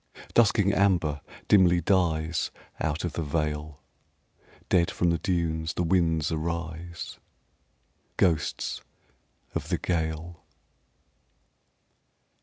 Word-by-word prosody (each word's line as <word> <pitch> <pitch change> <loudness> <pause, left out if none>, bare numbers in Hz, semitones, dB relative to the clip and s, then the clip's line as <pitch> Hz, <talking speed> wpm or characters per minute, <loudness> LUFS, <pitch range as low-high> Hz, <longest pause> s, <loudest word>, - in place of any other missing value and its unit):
Dusking 105 -3 +4
amber 90 -8 +2 0.3
dimly 90 -4 +5
dies 85 -3 +1 0.3
Out 80 +2 -1
of 85 - -3
the - - -2
vale. 75 -1 -2 0.8
Dead 85 -2 +3
from 85 -1 +1
the 85 - 0
dunes 80 -2 -1
the 90 - 0
winds 80 -2 +2
arise 85 +1 -4 1.0
Ghosts 80 -5 0 0.7
of - - -4
the - - +1
gale. 80 0 -3
85 Hz, 90 wpm, -27 LUFS, 80-90 Hz, 1.0 s, dimly